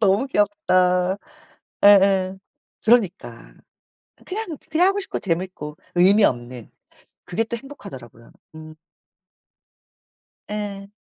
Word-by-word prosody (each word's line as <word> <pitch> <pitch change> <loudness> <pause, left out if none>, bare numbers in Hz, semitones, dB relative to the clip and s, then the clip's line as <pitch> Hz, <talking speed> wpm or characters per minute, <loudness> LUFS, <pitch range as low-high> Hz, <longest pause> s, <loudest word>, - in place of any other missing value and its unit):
너무 205 +4 +2
귀엽다. 185 -4 +1 0.7
예예 195 -2 +5 0.5
그러니까. 190 - 0 0.7
그냥 380 -5 -5
그냥 350 +4 +3
하고 395 +1 +1
싶고 385 - -5
재미있고 170 -4 -3 0.2
의미 195 +4 +5
없는 120 - -1 0.5
그게 180 +6 -1
또 235 +1 -5
행복하더라고요. 130 - -12 0.2
음. 155 0 -11 1.7
예. 205 -1 -5
195 Hz, 215 characters per minute, -22 LUFS, 165-220 Hz, 1.7 s, 예예